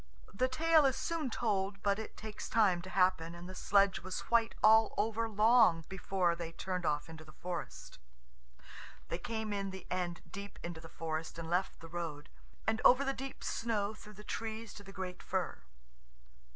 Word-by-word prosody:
The 255 +6 +2
tale 315 +2 +4
is 265 - +1
soon 330 -5 -2
told, 195 -4 -1
but 200 0 +2
it 220 - -7
takes 215 -1 -6
time 200 -6 +4
to 185 - -9
happen, 180 -3 +2
and 175 +1 -9
the 185 - -7
sledge 195 +1 +3
was 185 +1 -4
white 230 -1 +3
all 220 +1 +6
over 225 +2 0
long 215 -5 +5
before 190 -2 +1
they 165 -1 -6
turned 180 -1 -3
off 150 -1 0
into 160 -1 -10
the 155 - -14
forest. 175 +1 -6 1.1
They 170 - -2
came 220 -2 -3
in 200 -1 -2
the 190 -1 -8
end 180 -1 -2
deep 200 0 -8
into 170 -2 -5
the 165 - -11
forest, 160 0 -4
and 165 0 -5
left 185 +2 0
the 165 - -9
road, 165 -3 -5 0.4
and 220 0 +1
over 255 +3 +7
the 270 - +1
deep 270 0 -7
snow 215 -3 -1
through 210 0 -13
the 210 - -11
trees 220 0 -4
to 205 - -10
the 195 - -11
great 185 -2 -5
fir. 185 - -2
195 Hz, 185 wpm, -34 LUFS, 175-220 Hz, 1.1 s, over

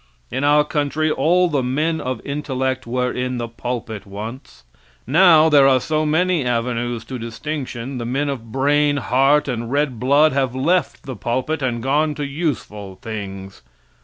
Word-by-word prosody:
In 130 +2 -2
our 145 +1 +5
country 150 +1 -1
all 180 +4 +3
the 145 -5 0
men 155 +6 -1
of 130 -3 -4
intellect 130 -3 -2
were 125 +1 -1
in 125 0 -3
the 120 -1 -3
pulpit 115 -3 -5
once. 105 - -8 0.4
Now 160 +2 +6
there 145 -3 +6
are 130 -1 +4
so 155 +2 -1
many 175 +1 +2
avenues 120 -1 -2
to 130 -2 -6
distinction 125 +1 -5
the 120 - -4
men 140 +4 -1
of 120 -5 -5
brain, 145 +3 +2
heart 135 +3 +2
and 120 -2 -3
red 140 -4 0
blood 140 +5 +4
have 135 -2 0
left 165 +5 0
the 130 -2 -6
pulpit 130 +8 -2
and 120 -3 -2
gone 150 +3 +1
to 145 - -3
useful 135 - -4
things. 100 -5 -7
130 Hz, 160 wpm, -20 LUFS, 120-150 Hz, 0.4 s, Now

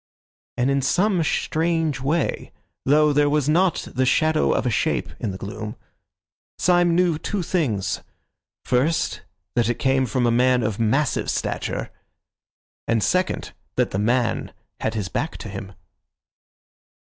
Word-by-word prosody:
And 125 +3 +2
in 140 0 +2
some 185 +6 +2
strange 160 -2 0
way, 150 +4 -1 0.3
though 150 +2 +4
there 145 0 +3
was 145 -2 +1
not 175 +3 +2
the 130 - +1
shadow 155 +4 +3
of - - 0
a 125 - +1
shape - - 0
in 110 - -2
the 95 - -5
gloom, 105 +2 -6 0.8
Syme 175 -1 +3
knew 175 -3 +2
two 200 +1 -2
things: 115 - -1 0.6
first, 140 +7 +1 0.3
that 120 -1 +2
it 120 - 0
came 130 -1 +2
from 120 +2 0
a 120 - +3
man 125 +1 +3
of 110 -1 -2
massive 125 +5 +1
stature; - - -2 1.0
and 115 -2 +2
second, 185 +1 0 0.2
that - - +1
the 95 - -1
man 120 +2 0 0.3
had - - -2
his 105 -4 -2
back 145 +11 -3
to 110 - -8
him. 95 0 -7
135 Hz, 145 wpm, -23 LUFS, 115-160 Hz, 1.0 s, though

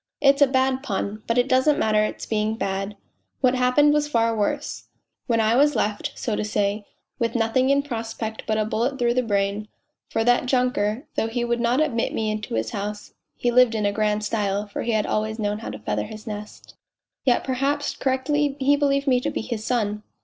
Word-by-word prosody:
It's 280 0 +4
a 285 - +8
bad 260 0 +1
pun, 210 -4 -3
but 230 - +1
it 245 +1 +3
doesn't 260 +3 +3
matter 215 -1 +2
it's 215 - -3
being 215 0 0
bad 195 -1 -3 0.4
what 255 -2 +4
happened 255 +4 +4
was 295 0 +1
far 230 -4 +1
worse, 210 -2 -2 0.4
when 230 -3 +2
I 220 +1 +3
was 290 +3 +4
left, 210 0 -1
so 225 - -2
to - - -1
say, 205 0 -1 0.3
with 230 0 -1
nothing 235 +3 +2
in 280 0 +3
prospect 225 -4 -5
but 215 -1 +1
a 215 - +1
bullet 235 +5 -1
through 240 -2 +2
the 255 - +2
brain, 205 -2 -1 0.4
for 225 - 0
that 245 +1 +3
junker, 250 -1 +1
though 225 - 0
he 240 +1 -2
would 235 0 0
not 240 +3 +2
admit 270 -7 0
me 220 -1 0
into 215 - -4
his 110 0 -1
house 210 +1 -5 0.2
(he 240 - +1
lived 245 -2 +5
in 205 -2 0
grand 210 0 0
style, 205 -1 -1
for 205 - -5
he 235 - -1
had 215 -1 +1
always 215 +1 -1
known 210 -1 -1
how 225 - -6
to - - -6
feather - - -2
his 215 0 -10
nest), 210 -1 -8 0.5
yet 250 -3 +2
perhaps 275 +3 -1
correctly 280 +2 0
he 280 +2 +4
believed 280 -1 +1
me 255 -3 +3
to - - -2
bo - - -3
his 230 -3 -4
son." 210 -3 -1
230 Hz, 210 wpm, -24 LUFS, 215-260 Hz, 0.5 s, a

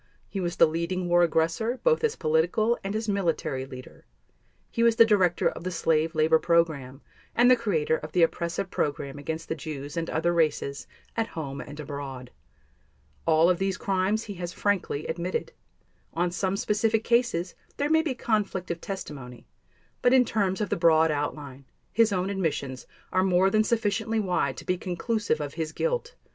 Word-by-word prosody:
He 195 - -5
was 175 -2 -2
the - - +6
leading 170 +3 -2
war 175 0 +5
aggressor, 170 +9 +1
both - - +3
as 455 -1 +1
political 175 +9 +2
and 195 +2 -3
as 220 +1 -2
military 165 -9 -1
leader; 130 -1 -11 0.7
he 230 - -1
was 230 -1 +5
the 230 -1 +7
director 190 -6 +3
of - - -4
the 185 - -2
slave 165 -1 +1
labor 160 +1 +4
program 155 -6 +1 0.3
and 245 +2 +6
the - - +8
creator 170 -10 0
of 155 - -8
the 175 +1 +3
oppressive 170 +3 -1
program 145 -3 -2
against 160 +3 -5
the - - -1
Jews 145 -3 -7
and 165 -1 -2
other 170 +2 +1
races, 150 -4 0 0.3
at 225 -1 0
home 140 -3 -6
and 145 0 -10
abroad. 135 -4 -7 1.0
All 160 +1 +5
of 180 -1 +2
these 195 -1 0
crimes 195 +3 0
he 205 - -7
has 175 -2 -5
frankly 185 -7 -1
admitted. 175 - -3 0.6
On 175 +1 +1
some 190 +2 -1
specific 220 +1 +1
cases 235 -8 +1 0.2
there 285 - 0
may 320 +1 +4
be 300 -5 -2
conflict 205 -7 -1
of 170 - -5
testimony 135 -11 -7 0.6
but 245 - +4
in 255 -1 +6
terms 200 -3 0
of 205 - -1
the - - +1
broad 160 -1 +4
outline, 145 -2 -4 0.3
his 225 -1 +3
own 190 0 0
admissions 145 -9 -3 0.2
are 185 - +2
more 190 +1 +3
than 215 +1 +4
sufficiently 220 0 0
wide 180 -9 0
to - - -9
be 180 -1 0
conclusive 205 +5 -1
of 145 -1 -4
his 160 -1 -3
guilt. - - -2
175 Hz, 180 wpm, -27 LUFS, 155-210 Hz, 1.0 s, the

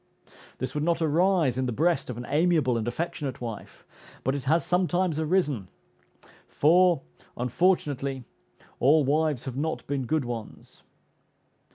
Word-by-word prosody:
This 130 - -4
would 150 -1 -2
not 170 0 +1
arise 160 -4 +2
in 130 - 0
the - - -1
breast 155 +4 +1
of 120 - -5
an 120 - -6
amiable 155 -5 +2
and 115 0 -2
affectionate 150 0 -3
wife, 115 -4 -8 0.4
but 130 - 0
it 140 -3 -4
has 160 +5 +2
sometimes 180 -2 +1
arisen; 150 - 0 0.8
for, 175 0 +3 0.3
unfortunately, 135 -1 0 0.6
all 150 +4 +5
wives 150 -1 0
have 130 -1 -5
not 160 +3 -2
been 135 -3 -3
good 155 -2 0
ones. 115 -3 -8
150 Hz, 140 wpm, -27 LUFS, 130-170 Hz, 0.8 s, all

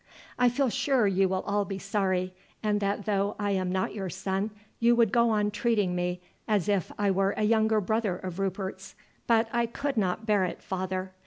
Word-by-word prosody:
"I 245 0 +5
feel 260 +2 +1
sure 260 0 +2
you 195 -1 +2
will 190 0 -1
all 205 0 0
be 195 -1 -5
sorry, 190 -2 -1 0.3
and 210 -1 +1
that 200 0 -1
though 200 -1 0
I 205 -1 -1
am 185 -2 0
not 185 0 -1
your 195 -3 -4
son 190 +3 -2 0.3
you 235 +1 +4
would 230 -4 +3
go 235 +1 +4
on 210 -1 +1
treating 210 -4 +1
me 180 0 -2 0.3
as 210 -4 +1
if 200 -5 0
I 205 -1 +2
were 195 +1 +1
a 215 - 0
younger 220 0 +3
brother 210 -1 0
of 185 0 -6
Rupert's. 195 0 -4 0.3
But 230 -1 +4
I 235 0 +2
could 280 +3 -3
not 200 +1 0
bear 210 -3 +3
it, 180 - -4
father. 185 0 -3
200 Hz, 200 wpm, -28 LUFS, 190-220 Hz, 0.3 s, I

